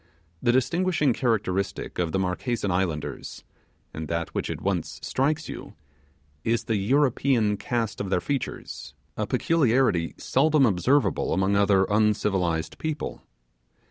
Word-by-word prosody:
The 120 - +3
distinguishing 150 +2 +2
characteristic 100 -7 -1
of 85 -2 0
the - - 0
Marquesan 95 +3 -1
islanders, 90 -5 -3 0.5
and 80 0 -5
that 85 +1 -3
which - - -2
at - - -4
once - - -2
strikes 150 +4 0
you, - - -8 0.7
is 115 0 +1
the 110 - 0
European 125 -1 +2
cast 115 0 -2
of 100 - -3
their 90 - +2
features 140 +9 -4 0.2
a - - -2
peculiarity 130 - +2
seldom 150 +1 +3
observable 120 +7 +2
among 95 +1 +2
other 100 -1 +4
uncivilized 100 -6 +1
people. 155 -1 -4
105 Hz, 125 wpm, -26 LUFS, 95-135 Hz, 0.7 s, other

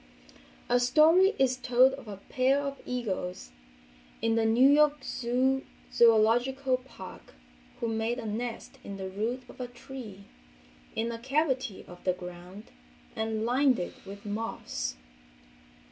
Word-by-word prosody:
A 245 +1 +3
story 320 - +5
is 260 -1 +2
told 255 +1 +4
of 270 -4 -9
a 200 -2 -7
pair 260 +7 +1
of 280 -1 -4
eagles 190 - -3 0.7
in 225 0 +1
the 225 0 +2
New 240 +4 +5
York 295 0 +4 0.9
Zoological 245 +4 +4
Park 250 -7 -12 0.4
who 235 - -1
made 225 +1 -1
a 240 - -6
nest 230 +2 -5
in 200 -1 -7
the 190 -1 -5
root 225 +6 -3
of 255 - -11
a 250 - -3
tree, 245 -5 -10 0.7
in 230 +1 -1
a 230 - -6
cavity 265 -4 -1
of 175 0 -13
the 185 - +2
ground 180 +4 -10 0.4
and 220 0 -1
lined 255 +2 +3
it 175 - -4
with 200 +1 -10
moss. 205 - -4
235 Hz, 135 wpm, -29 LUFS, 210-265 Hz, 0.9 s, story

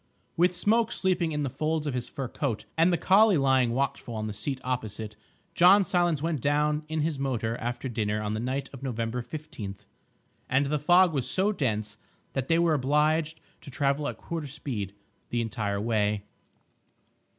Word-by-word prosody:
With 180 +1 +3
Smoke 220 +5 +2
sleeping 180 -3 0
in 150 -1 -1
the - - 0
folds 155 +3 -1
of 145 - -2
his 125 -1 -3
fur 135 -3 -4
coat, 120 -3 -3
and 165 +3 +4
the 175 - +2
collie 200 +3 +5
lying 130 -3 +3
watchful 125 -2 -2
on 110 0 -3
the 105 - -4
seat 130 +6 -3
opposite, 110 -4 -3 0.4
John 185 +4 +6
Silence 175 -6 +1
went 160 -5 -1
down 150 +2 +1
in 155 0 -1
his 150 -2 -1
motor 115 -5 -1
after 120 +2 -4
dinner 105 -3 -1
on 105 0 -2
the 110 - -2
night 130 +4 -2
of 135 - -9
November 120 -2 -2
15th. 120 - -8 0.6
And 130 +2 +3
the 150 +2 0
fog 175 +3 +5
was 135 -4 0
so 195 +3 +2
dense 110 - -2 0.3
that 135 -1 -2
they 165 - +3
were 170 -1 +3
obliged 155 +3 +1 0.2
to - - -11
travel 140 +2 0
at - - -4
quarter 165 -3 -5
speed 120 -9 -5 0.3
the 120 - -1
entire 105 -3 -2
way. 105 -2 0
140 Hz, 180 wpm, -27 LUFS, 115-160 Hz, 0.6 s, John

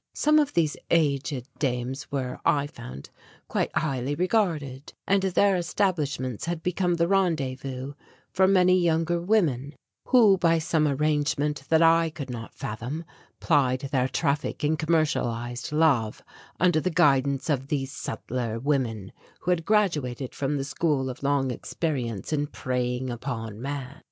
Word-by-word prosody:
Some 305 +1 +4
of 290 -1 0
these 160 -3 +2
aged 140 -5 +1
dames 130 -1 -2
were, 130 -3 -3
I 145 -1 +2
found, 70 - -10 0.4
quite - - 0
highly 135 -1 -1
regarded 160 - -1
and 200 0 +3
their 195 +1 +3
establishments 160 - -1
had 170 -1 -3
become 180 0 +1
the 170 0 +1
rendezvous 135 -8 -1 0.4
for 190 0 +3
many 185 -1 +5
younger 170 0 +1
women 155 - +1 0.3
who 215 -7 +5
by 165 -1 +3
some 160 -1 +1
arrangement 145 0 0
that 160 0 +5
I 165 0 +5
could 145 -4 -7
not 115 -2 -7
fathom 125 +10 -5 0.3
plied 135 -4 +1
their 130 -3 +2
traffic 145 +4 -1
in 150 +2 +2
commercialized 145 -8 -1
love 145 -9 +2 0.4
under 175 -2 +4
the 185 - 0
guidance 140 -4 +2
of 135 -4 0
these 135 -2 -2
subtler 115 -3 -4
women 120 -7 -1 0.3
who 180 - 0
had 165 -2 0
graduated 150 - 0
from 145 +1 -1
the 135 - -2
school 140 -1 0
of 125 - -11
long 140 -2 +1
experience 125 - -3
in 145 -1 0
preying 125 -2 -2
upon 115 -3 -5
man. 140 0 -5
145 Hz, 140 wpm, -26 LUFS, 130-165 Hz, 0.4 s, many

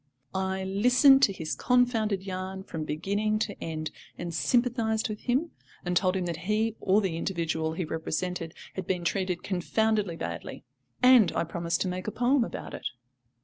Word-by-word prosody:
I 190 0 -1
listened 250 +8 +5
to 215 - +5
his 160 -5 -4
confounded 230 -6 +2
yarn 190 0 -5
from 160 -4 -5
beginning 200 +8 0
to 215 -1 -3
end, 155 -1 -4 0.3
and 175 -1 -5
sympathised 230 +3 +1
with 210 0 -4
him, 270 +7 0 0.3
and 180 0 -1
told 185 +1 +3
him 185 -2 -1
that 170 -2 -3
he, 220 +1 +1
or 200 +2 +3
the 180 -5 -1
individual 165 -3 -1
he 170 +1 -2
represented, 165 +1 -3 0.2
had 190 -2 -5
been 180 -2 -1
treated 185 -1 -1
confoundedly 205 0 0
badly; 85 - -6 0.4
and 250 -5 +7
I - - +2
promised 170 +1 -2
to - - +1
make 180 +1 -4
a - - -1
poem 245 +3 +2
about - - -6
it. - - -4
190 Hz, 170 wpm, -28 LUFS, 170-220 Hz, 0.4 s, and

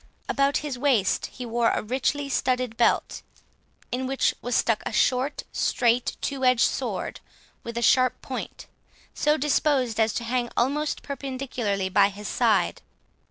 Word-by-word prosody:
About 280 +1 +2
his 265 -4 -4
waist 250 -9 +2
he 250 - -8
wore 235 0 +1
a - - -1
richly 265 +5 -1
studded 255 -3 0
belt, 235 - +1 0.7
in 255 +1 -2
which 270 0 +1
was 245 -1 -2
stuck 225 -2 +2
a - - -4
short 260 +3 +1
straight 240 0 +1
two 275 -2 -3
edged 255 -2 +5
sword, - - -3 0.4
with 235 0 -6
a 235 - -1
sharp 255 +2 +4
point, - - -6 0.5
so 300 +1 +2
disposed 270 -5 +1
as 220 0 +3
to 235 - -3
hang 240 +1 -1
almost 290 +5 0
perpendicularly 255 -8 -3
by 200 +1 +4
his 205 +1 -8
side. - - +1
250 Hz, 150 wpm, -25 LUFS, 235-275 Hz, 0.7 s, edged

